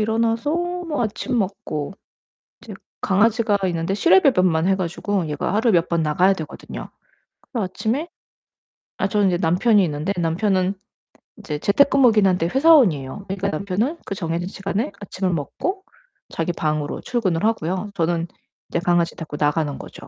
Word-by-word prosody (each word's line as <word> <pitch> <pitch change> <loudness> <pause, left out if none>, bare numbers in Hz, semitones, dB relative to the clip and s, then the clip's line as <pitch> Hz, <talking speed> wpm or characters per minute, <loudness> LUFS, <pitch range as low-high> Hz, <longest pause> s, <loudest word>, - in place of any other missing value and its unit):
일어나서 225 +4 0
뭐 350 -4 -2
아침 235 +3 -2
먹고 195 -5 -3 0.7
이제 - - -9 0.3
강아지가 215 +2 +2
있는데 170 +1 -1
실외 190 -1 +5
배변만 185 -9 +3
해 195 - +3
가지고 190 0 -2
얘가 150 +5 -2
하루에 225 +2 +3
몇 170 -1 +2
번 170 -1 +1
나가야 180 +6 +3
되거든요. 160 -4 -8 0.6
그 235 - -1
아침에 220 - -2 0.9
아 - - +1
저는 205 -2 +2
인제 175 - +1
남편이 190 +5 +3
있는데 155 +4 -2
남편은 185 +3 +1 0.6
인제 150 -9 -5
재택근무이기는 230 - +4
한데 180 -2 +1
회사원이에요. 205 - +3
그러니까 195 +1 -2
남편은 200 - -2
그 195 - -4
정해진 170 0 -3
시간에 195 +3 -3
아침을 185 -2 -2
먹고 370 - -3 0.5
자기 165 +1 -2
방으로 155 -2 -2
출근을 195 -8 -1
하고요 195 -2 -1
저는 170 0 0 0.4
인제 170 - -1
강아지 175 -1 +1
데리고 155 -3 -7
나가는 150 -1 0
거죠. - - -11
190 Hz, 360 characters per minute, -22 LUFS, 165-220 Hz, 0.9 s, 실외